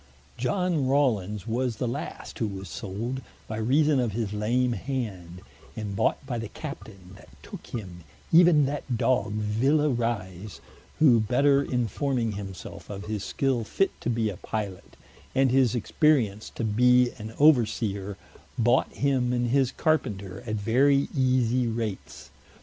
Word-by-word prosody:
Iohn 160 0 0
Rawlins 105 -8 +1
was 120 +1 -1
the 125 - -2
last 120 - -6
who 110 - 0
was 95 -1 -7
sold, 115 +7 -5 0.3
by 110 - -5
reason 140 +6 +3
of 120 -5 0
his 110 -2 -2
lame 120 +4 +1
hand, 100 -10 -5 0.3
and 105 -2 -5
bought 115 - 0
by 125 -3 -3
the 115 - -4
Captaine 100 - -9
that - - -17
tooke - - -10
him, 90 -7 -7 0.3
even 165 -3 +6
that 135 -3 -3
dog 120 -3 +1
Villa 120 +9 +1
Rise, 110 -6 -3 0.4
who 130 -7 +6
better 140 +6 +3
informing 125 -1 -1
himselfe 100 -2 -8
of 100 0 -6
his 105 -2 -3
skill 130 -4 0
fit 195 - 0
to - - -2
be 115 -2 0
a 95 - -9
Pilot, 100 -3 -5 0.4
and 135 -1 +3
his 130 -3 +3
experience 120 -4 +1
to - - -3
bee 125 +3 +4
an 110 +1 -8
over 140 -6 +6
seer, 100 -3 -4 0.4
bought 120 +1 +2
him 130 -3 0
and 120 -1 0
his 135 -1 +2
Carpenter 100 - -1
at 110 - -1
very 135 +7 +2
easie 125 -2 +2
rates. 110 -3 -5
120 Hz, 150 wpm, -26 LUFS, 105-135 Hz, 0.4 s, even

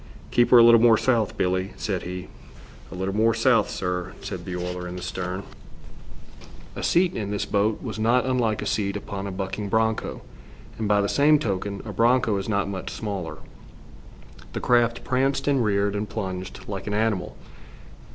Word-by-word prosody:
"Keep 120 - +3
'er 125 - +9
a 120 - +9
little 115 -1 +7
more 115 -2 +6
south, 115 -5 +1
Billie," 95 +1 0
said 95 -4 -2
he. 90 +1 -6 0.6
"'A - - -7
little 95 +2 -3
more 115 +1 +3
south,' 115 -2 +3
sir," 90 -1 -3
said - - -6
the 90 - -4
oiler 90 0 -4
in 90 - -6
the 90 - -6
stern. 90 +1 -4 1.3
A - - -5
seat 180 +1 +2
in 105 -3 -3
this 105 -1 -2
boat 105 +1 0
was - - -5
not 120 +3 +3
unlike 120 -4 0
a - - -5
seat 100 -1 -1
upon 100 -1 -6
a - - -4
bucking 95 +2 -4
broncho, 110 +1 0 0.6
and 110 - -1
by 105 0 +3
the 100 - 0
same 150 +6 +4
token, 100 -5 -3
a 105 - -6
broncho 115 +1 +3
is 95 - -4
not 100 -2 +1
much 95 -2 -5
smaller. 100 -6 -5 1.2
The - - -2
craft 120 -1 +2
pranced 135 +2 0
and 135 -4 +3
reared, 100 -1 +1
and 105 +1 -3
plunged 95 -4 -5
like 100 -1 -5
an 105 - -1
animal. 105 -4 -1
105 Hz, 180 wpm, -24 LUFS, 95-115 Hz, 1.3 s, er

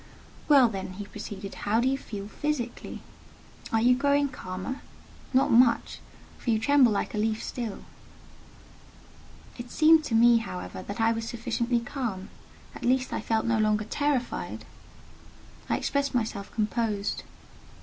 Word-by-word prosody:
"Well 275 -4 +7
then," 190 -4 -5
he 205 +2 -7
proceeded, 200 -1 -7
"how 215 +2 0
do 245 - +2
you 270 - +2
feel 205 -6 -7
physically? 250 0 -4 0.7
Are 225 - +3
you 250 +1 +6
growing 285 +1 +2
calmer? 185 +4 -6 0.5
Not 265 0 +3
much: 235 0 +4 0.4
for - - -4
you 225 - +4
tremble 255 +1 +4
like 205 - -1
a 210 - -1
leaf 220 0 0
still." 230 -5 -5 1.7
It 240 0 -7
seemed 315 +2 +5
to 230 - -1
me, 235 +1 +6
however, 185 -4 -5
that 200 +3 -7
I 225 0 +4
was 225 0 -3
sufficiently 235 +1 -1
calm: 235 -7 -4 0.4
at - - -10
least 255 +1 +1
I - - -2
felt 225 -1 0
no 230 -1 +2
longer 215 0 +2
terrified. 285 +1 -2 1.0
I - - +2
expressed 280 -2 -1
myself 220 -4 -2
composed. 215 -2 -1
230 Hz, 145 wpm, -27 LUFS, 215-260 Hz, 1.7 s, Well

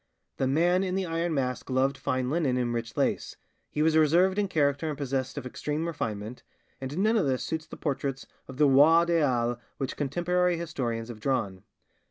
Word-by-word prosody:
The 130 - +1
Man 175 +7 +3
in 185 -1 -2
the 190 -1 0
Iron 165 0 -1
Mask 125 -2 -2
loved 130 +1 +1
fine 130 -1 -2
linen 145 -6 +1
and 120 -1 0
rich 115 -2 -4
lace, - - 0 0.3
he 150 - 0
was 160 0 +3
reserved 175 +6 +4
in 205 - +1
character 145 -2 +1
and 150 - -4
possessed 135 -2 -2
of - - -5
extreme 150 +5 -3
refinement, 115 -8 -4 0.4
and 135 +4 -5
none 215 +4 +3
of 190 - +2
this 130 -1 0
suits 160 -1 -4
the - - -10
portraits 140 -2 -3 0.2
of 130 - -10
the 150 0 +5
'roi 155 +5 +6
des 170 -1 +2
halles' 120 -5 +1 0.2
which 135 -2 -3
contemporary 175 +5 0
historians 120 -9 -3
have 115 -2 -8
drawn. 110 -7 -1
140 Hz, 195 wpm, -28 LUFS, 130-165 Hz, 0.4 s, roi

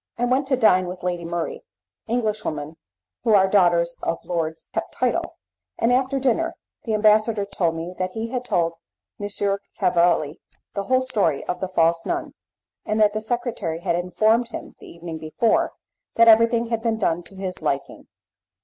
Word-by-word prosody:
I 245 - +1
went 260 +3 +1
to 265 -1 +2
dine 185 -6 +4
with 180 0 -7
Lady 175 -1 -2
Murray 170 0 -3 0.5
(English 220 -2 0
women 155 +1 -4 0.5
who 220 - +4
are 190 -1 +5
daughters 175 -3 +3
of 165 - -1
lords 160 -2 -3
keep - - +1
the - - -27
title), - - -1 0.4
and 235 +2 +2
after 265 +2 +1
dinner 330 +6 +1 0.3
the 220 -2 0
ambassador 215 0 +3
told 180 -4 -1
me 165 +2 -5
that 185 0 -2
he 225 +1 -4
had 250 0 -3
told 170 -8 0 0.5
M. 205 - -4 0.5
Cavalli 170 -3 +2 0.3
the 200 - -3
whole 255 +2 +2
story 200 - 0
of 180 - -3
the 190 - -2
false 165 -2 +2
nun, - - -3 0.5
and 215 +1 -1
that 210 -1 +4
the 215 - -2
secretary 220 -8 -2
had 170 - 0
informed 215 +7 +2
him, 235 - -8
the - - -13
evening 165 -1 -7
before, 160 +9 +1 0.4
that 230 0 +6
everything 230 +1 +5
had 230 -1 -1
been 225 -1 0
done 175 -5 0
to 175 +3 -14
his 190 -2 -5
liking. 140 -3 -3
200 Hz, 175 wpm, -23 LUFS, 170-230 Hz, 0.5 s, that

